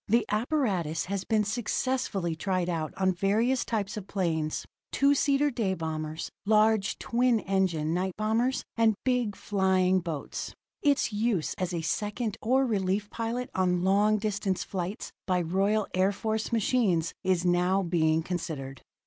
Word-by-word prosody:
The 230 +2 +3
apparatus 210 - 0
has 195 0 -3
been 215 -1 +2
successfully 210 -4 -1
tried 185 +1 -1
out 160 -3 -2
on 190 -1 +2
various 220 +8 +1
types 210 -1 -2
of 200 -2 -6
planes 160 -6 -1 0.3
two 280 +1 +4
seater 285 +1 +2
day 210 -6 -1
bombers, 155 -1 -4
large 215 -1 +3
twin 240 -1 +2
engine 180 -5 0
night 185 +1 -1
bombers 230 +4 +1
and 225 -2 +3
big 250 -5 +1
flying 190 -2 +2
boats. 165 -5 -5 0.3
Its 280 -6 +2
use 210 -6 0
as 185 -1 -1
a 170 -2 -2
second 210 +6 -2
or 260 +4 +3
relief 205 -2 -1
pilot 235 +2 -3
on 180 -1 +1
long 205 +3 +3
distance 205 -3 -1
flights 185 +2 -4 0.2
by 185 -1 +2
Royal 195 +5 +1
Air 185 +2 +3
Force 220 +2 -2
machines 210 -7 +1
is 185 -2 +1
now 180 +2 +2
being 160 -2 +2
considered. 160 -7 -5
195 Hz, 145 wpm, -28 LUFS, 180-220 Hz, 0.3 s, two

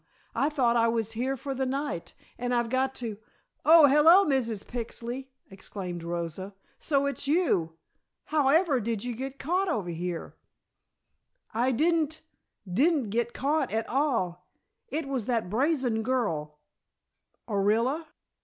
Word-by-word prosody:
I 280 - +1
thought 255 -6 +2
I 230 -1 +4
was 225 -1 0
here 255 +4 -2
for 275 +2 -4
the 265 0 -1
night 275 - -3 0.2
and 245 0 0
I've 235 -1 0
got 260 +1 +1
to 225 -4 -5 0.2
" - - -46 0.2
"Oh, 320 0 +9
hello, 315 +8 +7
Mrs. 235 -7 0
Pixley!" 240 +2 -5 0.2
exclaimed 185 -2 -7
Rosa. 170 +3 -4 0.2
"So 280 -3 +1
it's 280 0 -3
you! 195 - +1 0.5
However 300 0 +3
did 225 -2 -2
you 245 0 -3
get 265 +3 -5
caught 360 +8 0
over 195 - -1
here?" 170 0 -5 1.2
"I 245 +4 +2
didn't 315 +3 +1 0.5
didn't 260 - +2
get 235 +1 0
caught 295 +4 0
at 220 +1 -1
all. 230 - -1 0.4
It 300 +2 -3
was 260 -6 -3
that 230 -7 -1
brazen 255 -2 +1
girl 185 -12 -1 0.5
" - - -51
"Orilla?" 230 +9 +1
245 Hz, 140 wpm, -28 LUFS, 215-280 Hz, 1.2 s, Oh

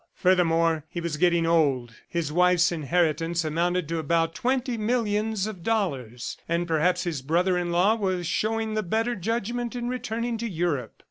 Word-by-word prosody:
Furthermore, 165 -3 +2
he 175 - -5
was 170 -2 -3
getting 170 0 +3
old, 140 -8 +2 0.2
his 165 -4 -2
wife's 180 +1 +4
inheritance 165 +1 0
amounted 170 +2 0
to 165 +1 -2
about 165 +1 +1
twenty 250 +4 0
millions 215 -2 0
of 215 -5 -6
dollars, 140 - -2
and 170 +1 0
perhaps 165 +2 +2
his 165 -7 -3
brother 175 +6 +1
in 175 -1 -1
law 180 +5 +4
was 185 -5 -1
showing 220 +5 -1
the 215 - 0
better 225 +5 0
judgment 235 +4 -2
in 240 0 -3
returning 235 -1 -3
to 230 0 -3
Europe. 160 - -2
175 Hz, 160 wpm, -26 LUFS, 165-220 Hz, 0.2 s, wife's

